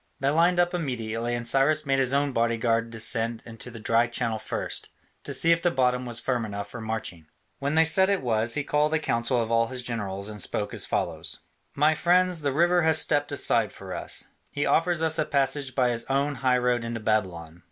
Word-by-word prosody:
They 135 - +1
lined 170 +4 +3
up 175 0 +2
immediately, 120 -7 -2
and 120 0 -5
Cyrus 145 +4 +2
made 135 -1 +1
his 130 -1 +1
own 140 0 +1
bodyguard 115 -1 0
descend 115 0 -1
into 115 +1 -10
the 115 -1 -10
dry 115 +2 +2
channel 115 -2 -2
first, 110 - -4 0.3
to - - -6
see 165 - +2
if 170 0 +3
the 175 - +2
bottom 125 -3 0
was 120 -1 0
firm 125 -3 -1
enough 100 -2 -6
for 120 - -7
marching. 110 -8 -5 0.3
When 140 +2 -1
they 160 0 +5
said 190 +4 +3
it 200 -6 0
was, 115 -1 +1
he 145 - -1
called 150 +2 +1
a - - +1
council 120 -3 0
of 115 -1 -2
all 115 0 +3
his 125 +1 -6
generals 100 -5 -4
and 105 -1 -4
spoke - - -1
as - - 0
follows: - - -2 0.3
"My 150 +2 +4
friends, 180 +1 +2
the 140 -1 0
river 175 +5 +3
has 160 -1 +4
stepped 145 -2 +1
aside - - +1
for - - -9
us; - - -2 0.3
he 145 - -2
offers 165 -1 +2
us 160 0 +2
a - - +3
passage 135 -1 -1
by 125 -2 +2
his 115 -1 -3
own 140 +2 0
high 130 -1 +3
road 125 -1 +1
into 115 0 -4
Babylon. 90 -7 -2
125 Hz, 215 wpm, -26 LUFS, 115-150 Hz, 0.3 s, they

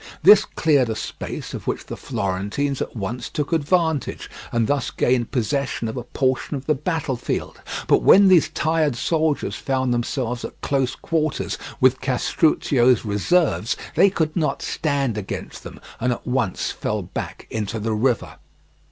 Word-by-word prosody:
This 210 +2 +8
cleared 145 -7 +2
a 110 - -1
space - - -6
of - - -7
which - - -2
the - - -6
Florentines 100 +9 -2
at - - -4
once 115 +3 -4
took 150 +1 -3
advantage, 160 -1 0 0.2
and 115 -1 +1
thus 140 +1 0
gained 120 -2 +1
possession 130 -1 -1
of 110 - -4
a 125 - -3
portion 130 +3 -1
of 135 - -9
the 155 - +3
battlefield. 150 -4 -3 0.2
But - - +4
when 200 +1 +7
these 180 -4 +5
tired 155 -4 +1
soldiers 155 +3 0
found 130 -2 0
themselves 120 0 -2
at - - -8
close 135 -3 0
quarters 155 -2 -2 0.2
with 130 -1 +4
Castruccio's 130 -2 +2
reserves 115 - +1 0.2
they 200 - +5
could 160 -5 -1
not 155 -3 0
stand 140 -7 -1
against 100 - -6
them - - -10 0.2
and 125 +1 +1
at - - -9
once 125 -6 -1
fell - - -3
back - - -6
into 110 +1 -3
the 110 +1 -1
river. 120 +2 0
130 Hz, 155 wpm, -22 LUFS, 120-155 Hz, 0.2 s, This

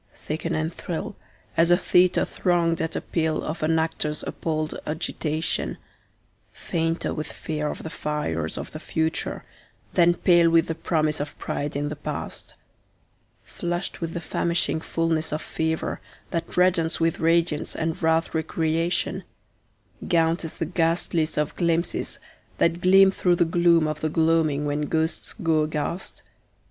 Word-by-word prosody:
Thicken 165 +2 -3
and 155 +1 -1
thrill 190 +6 -5 0.4
as 165 +1 +4
a 175 - +6
theatre 180 -1 +3
thronged 170 -2 +1
at 160 0 -2
appeal 160 -2 -1
of 160 +2 -4
an 160 +1 +2
actor's 155 -2 -1
appalled 155 -1 -2
agitation, 155 0 -2 0.7
Fainter 165 0 -2
with 155 - -4
fear 150 -1 -3
of - - -6
the 160 - -5
fires 85 - -2
of - - -6
the 155 - -7
future 160 +1 -2 0.5
than 175 -1 +5
pale 175 -1 +5
with 165 0 +4
the 165 - -2
promise 155 -2 0
of 145 +1 -5
pride 145 0 -3
in 145 +1 -1
the 150 - -4
past; 145 - -6 0.9
Flushed 175 +2 -4
with 165 -1 -3
the 170 - -2
famishing 170 -1 0
fullness 165 -1 -1
of 150 - -1
fever 160 0 -2 0.3
that 170 +1 -3
reddens 180 -3 +3
with 165 0 +1
radiance 165 -1 +1
and 160 0 0
rathe* 160 0 +2
recreation, 160 +1 0 0.8
[speedy] - - -8
Gaunt 165 0 +2
as 160 - -6
the 165 - -1
ghastliest 165 -1 0
of 150 0 0
glimpses 170 -1 0 0.4
that 170 +1 +2
gleam 190 +1 +7
through 180 -2 +2
the 170 - +3
gloom 170 -1 +4
of 155 0 -3
the 155 - 0
gloaming 160 -2 +2
when 145 0 -1
ghosts 160 +1 -1
go 165 -5 +2
aghast? 155 +4 -3
165 Hz, 150 wpm, -25 LUFS, 155-170 Hz, 0.9 s, gleam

